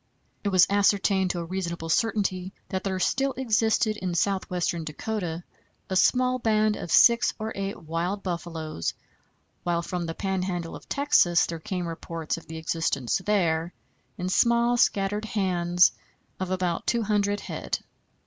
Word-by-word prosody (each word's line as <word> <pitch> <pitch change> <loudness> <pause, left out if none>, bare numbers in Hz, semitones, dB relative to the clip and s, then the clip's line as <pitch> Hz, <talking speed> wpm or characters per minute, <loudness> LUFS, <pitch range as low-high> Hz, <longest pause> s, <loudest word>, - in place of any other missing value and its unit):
It 205 - +1
was 185 -2 +6
ascertained 200 -1 +2
to 175 - -2
a - - -5
reasonable 170 -2 -4
certainty 190 -2 0 0.2
that 190 0 -3
there 190 -1 -2
still 270 +8 +1
existed 220 -3 +1
in 180 -3 -3
southwestern 180 -2 0
Dakota 175 +1 -4 0.5
a - - 0
small 255 +7 +3
band 215 -2 +2
of 175 - -6
six 235 +3 +5
or 220 0 -4
eight 195 -2 -4
wild 170 +5 -2
buffaloes, 165 - -4 0.7
while 170 -1 0
from 175 -1 -3
the 165 - -4
Pan 190 -1 -1
handle 175 -3 -3
of - - -13
Texas 280 - +4
there 165 -1 -5
came 180 +2 -3
reports 165 -1 -4
of 165 - -11
the 160 - -7
existence 160 -3 -1
there, 170 -5 +1 0.4
in 180 - -3
small 235 +4 +3
scattered 205 -2 +1
hands, 180 -4 +3 0.5
of 185 -1 -3
about 180 -2 -1
two 235 -1 +2
hundred 205 -1 +1
head. - - -3
185 Hz, 150 wpm, -26 LUFS, 170-210 Hz, 0.7 s, was